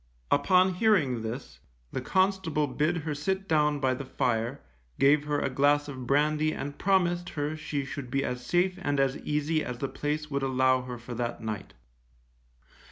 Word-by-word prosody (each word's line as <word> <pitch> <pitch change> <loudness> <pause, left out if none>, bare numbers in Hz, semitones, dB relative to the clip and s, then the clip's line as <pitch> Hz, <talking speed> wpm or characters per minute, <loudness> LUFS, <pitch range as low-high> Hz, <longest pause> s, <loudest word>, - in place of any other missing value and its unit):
Upon 185 +5 +4
hearing 180 - +2
this, 110 - -6 0.3
the - - -3
constable 185 -5 +1
bid 150 +6 0
her 155 - -1
sit 190 +7 -2
down 150 -2 +2
by 130 -2 +2
the 130 - -5
fire, 120 0 -1 0.4
gave 145 +2 +4
her 145 -1 0
a - - 0
glass 145 +2 +2
of 130 -3 -7
brandy 150 +3 +2
and 145 +1 -6
promised 175 -2 +2
her 150 0 -3
she 150 -3 -3
should 135 -1 -6
be 135 +2 0
as 125 -1 -3
safe 180 +6 +1
and 145 -4 0
as 135 0 +2
easy 150 +1 0
as 125 - -5
the 135 - -2
place 150 +2 -3
would 140 0 0
allow 130 -1 +2
her 125 -1 -6
for 120 +1 -8
that 120 0 -3
night. 105 - -5
145 Hz, 175 wpm, -28 LUFS, 130-155 Hz, 0.4 s, Upon